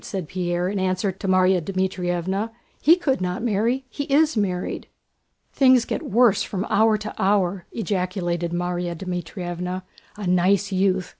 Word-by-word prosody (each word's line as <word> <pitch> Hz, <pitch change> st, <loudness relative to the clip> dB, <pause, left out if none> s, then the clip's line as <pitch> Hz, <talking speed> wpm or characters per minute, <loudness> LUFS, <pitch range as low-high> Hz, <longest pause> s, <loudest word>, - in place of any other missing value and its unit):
said 190 Hz, -5 st, -5 dB
Pierre, 175 Hz, 0 st, -1 dB
in 200 Hz, +1 st, -2 dB
answer 185 Hz, +1 st, 0 dB
to 195 Hz, +1 st, -7 dB
Márya 185 Hz, -1 st, +4 dB
Dmítrievna. 185 Hz, +2 st, -1 dB, 0.3 s
"He 325 Hz, +4 st, +7 dB
could 275 Hz, -, -1 dB
not 180 Hz, +3 st, -2 dB
marry—he 240 Hz, +5 st, -1 dB
is 300 Hz, +2 st, +3 dB
married!" 185 Hz, -4 st, -2 dB, 0.7 s
"Things 255 Hz, -3 st, +5 dB
get -, -, -3 dB
worse 220 Hz, -2 st, +3 dB
from 195 Hz, -1 st, -3 dB
hour 220 Hz, 0 st, +4 dB
to 215 Hz, 0 st, -6 dB
hour!" 190 Hz, -2 st, +1 dB
ejaculated 180 Hz, -5 st, -2 dB
Márya 175 Hz, 0 st, -2 dB
Dmítrievna. 180 Hz, 0 st, -4 dB, 0.3 s
"A 210 Hz, -, -5 dB
nice 185 Hz, +3 st, +2 dB
youth! 190 Hz, -1 st, +1 dB
190 Hz, 140 wpm, -23 LUFS, 180-210 Hz, 0.7 s, He